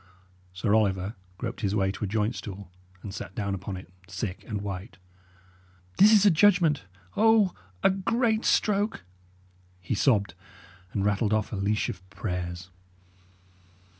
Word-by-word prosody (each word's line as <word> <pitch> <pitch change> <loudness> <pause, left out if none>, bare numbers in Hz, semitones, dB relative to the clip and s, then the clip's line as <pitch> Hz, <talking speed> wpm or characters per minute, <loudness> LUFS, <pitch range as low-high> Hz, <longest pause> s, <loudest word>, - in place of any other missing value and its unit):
Sir 95 +3 0
Oliver 100 -2 +2 0.2
groped 115 +1 -5
his 100 -1 0
way 95 -2 +2
to 95 - -6
a - - 0
joint 105 +3 0
stool, 100 -5 -8 0.3
and 100 - -6
sat 95 -2 -7
down 100 -2 -2
upon 95 0 -5
it, 90 -1 -12
sick 95 0 -5
and 105 -2 -3
white. 95 -4 -6 1.0
"This 210 +2 +8
is 210 -2 +6
a 205 - +7
judgment! 165 - +4 0.3
O, 220 -3 +4 0.3
a - - +6
great 220 +4 +1
stroke!" 205 - +1 0.8
he 90 - -3
sobbed, 100 -9 +2 0.6
and 100 -1 -1
rattled 105 +1 +1
off 110 0 0
a - - -1
leash 100 +2 0
of 95 0 -8
prayers. 90 -2 -5
105 Hz, 145 wpm, -27 LUFS, -, 1.0 s, This